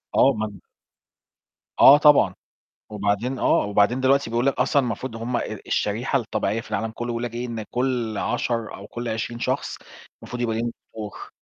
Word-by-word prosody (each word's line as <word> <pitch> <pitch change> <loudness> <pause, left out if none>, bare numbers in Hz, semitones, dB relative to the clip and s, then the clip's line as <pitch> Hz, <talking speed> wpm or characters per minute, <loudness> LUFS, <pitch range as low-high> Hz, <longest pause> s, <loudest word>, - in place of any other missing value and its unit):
آه. 135 - +5
ما 110 -1 -3 1.3
آه 140 - +10
طبعًا. 145 - +5 0.5
وبعدين 105 +5 -1
آه، - - +3
وبعدين 105 +5 +2
دلوقتي 135 -1 +3
بيقول 120 +2 0
لك 140 - +3
أصلًا 135 +3 +2
المفروض 120 0 -4
هُم 120 +2 -2
ال - - -5
الشريحة 115 +6 0
الطبيعية 110 -1 -2
في - - -15
العالم 115 0 -1
كله 120 +1 -5
بيقولوا 120 -1 -2
لك 115 - -14
إيه 120 +1 -3
إن 115 -2 -4
كل 125 -4 -1
10 115 0 -2
أو 100 - -11
كل 120 +2 -6
20 115 +1 -3
شخص - - -2 0.5
المفروض 125 0 -6
يبقى 115 -2 0
ليهم 120 +1 -1 0.2
دكتور. 105 -2 -8
120 Hz, 175 wpm, -24 LUFS, 110-125 Hz, 1.3 s, آه